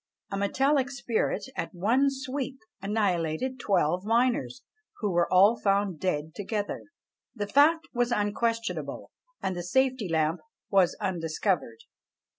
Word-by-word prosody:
A 195 Hz, -, -2 dB
metallic 270 Hz, +7 st, +2 dB
spirit 240 Hz, -4 st, -1 dB
at -, -, -4 dB
one 235 Hz, +10 st, +3 dB
sweep 270 Hz, 0 st, -4 dB, 0.2 s
annihilated 200 Hz, +3 st, -1 dB
twelve 180 Hz, -5 st, +1 dB
miners, 245 Hz, +3 st, +1 dB, 0.3 s
who 210 Hz, -4 st, -1 dB
were 175 Hz, -1 st, +1 dB
all 200 Hz, +5 st, +6 dB
found 195 Hz, -4 st, +1 dB
dead 155 Hz, -3 st, -2 dB
together. 205 Hz, 0 st, -3 dB, 0.5 s
The 205 Hz, -3 st, -2 dB
fact 310 Hz, +8 st, +4 dB
was 245 Hz, 0 st, +1 dB
unquestionable; 230 Hz, +2 st, -1 dB, 0.3 s
and 190 Hz, -, -1 dB
the 175 Hz, -, -3 dB
safety 255 Hz, +2 st, +1 dB
lamp 160 Hz, +1 st, +1 dB, 0.3 s
was 190 Hz, -3 st, +3 dB
undiscovered. 175 Hz, -, -1 dB
205 Hz, 120 wpm, -28 LUFS, 180-255 Hz, 0.5 s, all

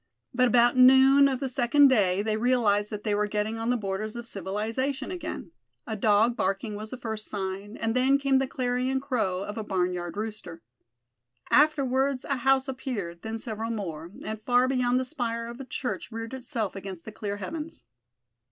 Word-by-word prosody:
But 250 Hz, 0 st, +3 dB
about 240 Hz, 0 st, +4 dB
noon 265 Hz, +2 st, +7 dB
of 265 Hz, -2 st, -1 dB
the 270 Hz, -, -1 dB
second 265 Hz, +3 st, +4 dB
day 200 Hz, -6 st, +2 dB
they 215 Hz, 0 st, 0 dB
realized 215 Hz, -3 st, +2 dB
that 210 Hz, -1 st, -6 dB
they 210 Hz, -, 0 dB
were 210 Hz, 0 st, +1 dB
getting 210 Hz, +2 st, -2 dB
on 225 Hz, +1 st, -2 dB
the 245 Hz, -, +2 dB
borders 210 Hz, +1 st, -4 dB
of 235 Hz, 0 st, -6 dB
civilization 225 Hz, -, -3 dB
again. 345 Hz, -3 st, -6 dB, 0.3 s
A 220 Hz, -, -4 dB
dog 215 Hz, +3 st, +3 dB
barking 195 Hz, +2 st, -1 dB
was 215 Hz, +1 st, -6 dB
the 255 Hz, -, -6 dB
first 220 Hz, -3 st, -4 dB
sign, 195 Hz, +1 st, -5 dB
and 225 Hz, 0 st, -1 dB
then 265 Hz, +2 st, +4 dB
came 275 Hz, -1 st, +2 dB
the 270 Hz, -, 0 dB
clarion 255 Hz, 0 st, -1 dB
crow 210 Hz, -9 st, -1 dB
of 205 Hz, +2 st, -5 dB
a -, -, -3 dB
barnyard 180 Hz, -3 st, -2 dB
rooster. 210 Hz, -6 st, -6 dB, 0.9 s
Afterwards 275 Hz, -3 st, +3 dB
a 275 Hz, -, -1 dB
house 265 Hz, +2 st, +3 dB
appeared, 220 Hz, -10 st, -5 dB
then 225 Hz, 0 st, -4 dB
several 225 Hz, 0 st, -5 dB
more; 170 Hz, -7 st, -5 dB
and 215 Hz, 0 st, -5 dB
far 245 Hz, +2 st, +3 dB
beyond 250 Hz, -1 st, +2 dB
the 260 Hz, -, -2 dB
spire 235 Hz, -5 st, -3 dB
of 235 Hz, +2 st, -8 dB
a 270 Hz, -, -6 dB
church 250 Hz, -1 st, -4 dB
reared 225 Hz, +2 st, -6 dB
itself 240 Hz, -6 st, -3 dB
against 190 Hz, -3 st, -8 dB
the 220 Hz, -, -7 dB
clear 205 Hz, -1 st, -4 dB
heavens. 310 Hz, -, -6 dB
230 Hz, 185 wpm, -27 LUFS, 205-260 Hz, 0.9 s, noon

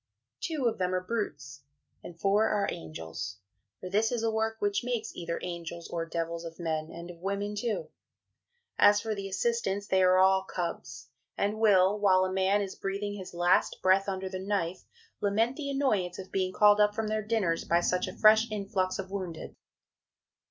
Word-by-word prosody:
Two 310 Hz, -6 st, -2 dB
of 230 Hz, -, +1 dB
them 185 Hz, 0 st, 0 dB
are 185 Hz, -, -1 dB
brutes, 145 Hz, -, -4 dB, 0.4 s
and 170 Hz, -1 st, -10 dB
four 205 Hz, +4 st, +3 dB
are 205 Hz, -2 st, +1 dB
angels 80 Hz, +4 st, -6 dB, 0.4 s
for -, -, -7 dB
this 215 Hz, +5 st, +1 dB
is 240 Hz, -2 st, -1 dB
a 225 Hz, -, +1 dB
work 220 Hz, 0 st, 0 dB
which 205 Hz, 0 st, 0 dB
makes 240 Hz, -2 st, -3 dB
either 170 Hz, -1 st, -3 dB
angels 170 Hz, -1 st, -6 dB
or 165 Hz, -1 st, -3 dB
devils 165 Hz, 0 st, -3 dB
of 165 Hz, -1 st, -8 dB
men 160 Hz, -2 st, -2 dB
and 170 Hz, +1 st, -8 dB
of 170 Hz, -, -14 dB
women 200 Hz, +3 st, -3 dB
too. 205 Hz, -6 st, -2 dB, 0.9 s
As 205 Hz, 0 st, +6 dB
for 220 Hz, 0 st, -3 dB
the 200 Hz, -1 st, -5 dB
assistants, 200 Hz, -1 st, -1 dB
they 190 Hz, -2 st, +2 dB
are 185 Hz, 0 st, +5 dB
all 190 Hz, 0 st, +5 dB
Cubs, 145 Hz, -7 st, -5 dB, 0.3 s
and 205 Hz, +2 st, 0 dB
will, 205 Hz, -2 st, +4 dB
while 185 Hz, -2 st, +4 dB
a 185 Hz, -, -3 dB
man 190 Hz, +2 st, +2 dB
is 195 Hz, -, -5 dB
breathing 200 Hz, +1 st, -3 dB
his 190 Hz, -3 st, -8 dB
last 175 Hz, +1 st, +2 dB
breath 190 Hz, +1 st, +4 dB
under 190 Hz, 0 st, -3 dB
the 185 Hz, 0 st, -5 dB
knife, 190 Hz, -2 st, -2 dB, 0.3 s
lament 220 Hz, +5 st, +1 dB
the 280 Hz, -1 st, -4 dB
"annoyance 215 Hz, -11 st, 0 dB
of 190 Hz, -1 st, -9 dB
being 185 Hz, -1 st, 0 dB
called 210 Hz, +2 st, +5 dB
up 210 Hz, 0 st, +3 dB
from 220 Hz, 0 st, -1 dB
their 215 Hz, 0 st, -1 dB
dinners 205 Hz, -6 st, 0 dB
by 170 Hz, -, +2 dB
such 180 Hz, +1 st, 0 dB
a -, -, -8 dB
fresh 220 Hz, +1 st, +6 dB
influx 195 Hz, -3 st, -1 dB
of 195 Hz, 0 st, -6 dB
wounded"! 185 Hz, -5 st, -5 dB
195 Hz, 185 wpm, -29 LUFS, 175-210 Hz, 0.9 s, As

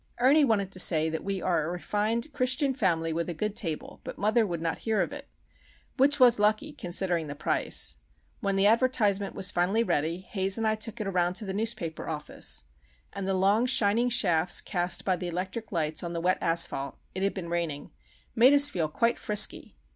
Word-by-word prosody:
Ernie 275 Hz, +5 st, +5 dB
wanted 205 Hz, -7 st, +1 dB
to 185 Hz, -, -4 dB
say 160 Hz, -3 st, +3 dB
that 160 Hz, -, -4 dB
we 195 Hz, -2 st, -3 dB
are 170 Hz, -4 st, +1 dB
a 155 Hz, -, -3 dB
refined 210 Hz, -, -2 dB
Christian 265 Hz, +2 st, +1 dB
family 165 Hz, -9 st, 0 dB
with 170 Hz, +2 st, -2 dB
a 170 Hz, -, -4 dB
good 210 Hz, +5 st, -3 dB
table, 165 Hz, -9 st, -4 dB
but -, -, -8 dB
mother 215 Hz, +2 st, +2 dB
would 170 Hz, -3 st, -4 dB
not 165 Hz, 0 st, -3 dB
hear 220 Hz, -2 st, -1 dB
of 195 Hz, -, -1 dB
it;—which 285 Hz, 0 st, -3 dB
was 245 Hz, -3 st, +6 dB
lucky, 215 Hz, +8 st, +1 dB
considering 175 Hz, -, -1 dB
the 145 Hz, -, -6 dB
price! -, -, -1 dB, 0.4 s
When 195 Hz, -1 st, -1 dB
the 195 Hz, +1 st, +2 dB
advertisement 215 Hz, -3 st, +2 dB
was 185 Hz, -, 0 dB
finally 190 Hz, +6 st, +1 dB
ready, 165 Hz, -2 st, -1 dB
Haze 190 Hz, +1 st, -1 dB
and 225 Hz, -, -1 dB
I 215 Hz, -, +2 dB
took 215 Hz, 0 st, -6 dB
it -, -, -3 dB
around 180 Hz, -2 st, 0 dB
to 215 Hz, -, -2 dB
the 190 Hz, -, -4 dB
newspaper 200 Hz, -8 st, -3 dB
office;—and 65 Hz, -, -6 dB
the 195 Hz, -, 0 dB
long 200 Hz, +6 st, +2 dB
shining 235 Hz, -1 st, +2 dB
shafts 175 Hz, -7 st, +3 dB
cast 175 Hz, -2 st, -2 dB
by 185 Hz, -2 st, +1 dB
the 180 Hz, 0 st, -5 dB
electric 190 Hz, +6 st, -5 dB
lights 155 Hz, -4 st, -1 dB
on 170 Hz, -1 st, -5 dB
the 170 Hz, -, -3 dB
wet 185 Hz, +2 st, +1 dB
asphalt 165 Hz, -4 st, 0 dB, 0.2 s
(it 190 Hz, -, -5 dB
had 195 Hz, +1 st, 0 dB
been 175 Hz, -3 st, -6 dB
raining) 170 Hz, -4 st, -3 dB, 0.4 s
made 250 Hz, +4 st, +6 dB
us 285 Hz, 0 st, +6 dB
feel 165 Hz, -4 st, -1 dB
quite 230 Hz, +10 st, 0 dB
frisky. 210 Hz, -1 st, 0 dB
195 Hz, 195 wpm, -27 LUFS, 170-225 Hz, 0.4 s, was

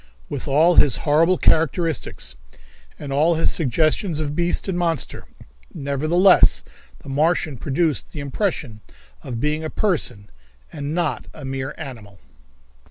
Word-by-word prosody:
With -, -, -5 dB
all 160 Hz, +5 st, +4 dB
his 140 Hz, -6 st, +6 dB
horrible 165 Hz, +5 st, +4 dB
characteristics, 160 Hz, +1 st, 0 dB, 0.6 s
and 140 Hz, -2 st, -6 dB
all 160 Hz, +4 st, +3 dB
his 165 Hz, -, +2 dB
suggestions 155 Hz, -, +1 dB
of 150 Hz, -1 st, -3 dB
beast 175 Hz, +3 st, -1 dB
and 190 Hz, -, -1 dB
monster, 170 Hz, -3 st, -2 dB, 0.5 s
nevertheless 155 Hz, +7 st, +3 dB, 0.4 s
the -, -, -10 dB
Martian 155 Hz, +1 st, +1 dB
produced 150 Hz, +3 st, -1 dB
the -, -, -7 dB
impression 140 Hz, -, -3 dB, 0.4 s
of 120 Hz, -3 st, -6 dB
being 150 Hz, +4 st, -1 dB
a 155 Hz, -, -3 dB
person 125 Hz, -, -1 dB, 0.4 s
and 145 Hz, +2 st, -4 dB
not 165 Hz, -7 st, -2 dB
a 150 Hz, -, -9 dB
mere 135 Hz, +1 st, -4 dB
animal. 115 Hz, -, -9 dB
150 Hz, 130 wpm, -22 LUFS, 135-165 Hz, 0.6 s, his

